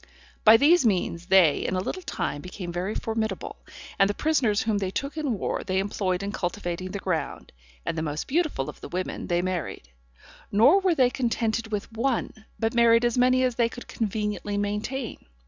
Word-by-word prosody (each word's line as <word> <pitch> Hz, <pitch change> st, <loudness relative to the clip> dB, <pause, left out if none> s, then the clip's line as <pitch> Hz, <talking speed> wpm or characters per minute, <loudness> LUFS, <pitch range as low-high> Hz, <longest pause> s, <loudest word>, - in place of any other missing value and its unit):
By 220 Hz, +1 st, +9 dB
these 315 Hz, +6 st, +5 dB
means 180 Hz, -5 st, 0 dB
they 185 Hz, -6 st, +5 dB
in 185 Hz, -, -2 dB
a -, -, +1 dB
little 290 Hz, -, -4 dB
time 170 Hz, -, -3 dB
became 180 Hz, 0 st, -7 dB
very 185 Hz, +4 st, -2 dB
formidable, 220 Hz, -3 st, -3 dB, 0.4 s
and 195 Hz, -, +5 dB
the 205 Hz, -, -1 dB
prisoners 255 Hz, -10 st, +1 dB
whom 220 Hz, -2 st, 0 dB
they 190 Hz, -2 st, -1 dB
took 275 Hz, +10 st, -4 dB
in 290 Hz, -8 st, -1 dB
war -, -, -2 dB
they 185 Hz, 0 st, -1 dB
employed 190 Hz, -1 st, -1 dB
in 200 Hz, -, -3 dB
cultivating 175 Hz, -1 st, -3 dB
the 200 Hz, -, -4 dB
ground, 185 Hz, -5 st, -3 dB, 0.3 s
and -, -, -2 dB
the 160 Hz, -, -2 dB
most 150 Hz, -1 st, -3 dB
beautiful 310 Hz, -, 0 dB
of -, -, -9 dB
the -, -, -8 dB
women 185 Hz, +1 st, -4 dB
they 175 Hz, 0 st, +1 dB
married; 180 Hz, -, -4 dB, 0.6 s
nor 250 Hz, -, +6 dB
were 375 Hz, -3 st, +2 dB
they 255 Hz, -4 st, +4 dB
contented 230 Hz, -3 st, -1 dB
with 210 Hz, +2 st, -3 dB
one, 235 Hz, +2 st, -1 dB, 0.3 s
but 225 Hz, 0 st, 0 dB
married 235 Hz, 0 st, +5 dB
as 240 Hz, -, +1 dB
many 255 Hz, +1 st, +4 dB
as 255 Hz, -1 st, +1 dB
they 230 Hz, 0 st, +1 dB
could 245 Hz, -, -10 dB
conveniently 210 Hz, -1 st, -2 dB
maintain. 210 Hz, +5 st, -3 dB
210 Hz, 190 wpm, -26 LUFS, 185-245 Hz, 0.6 s, By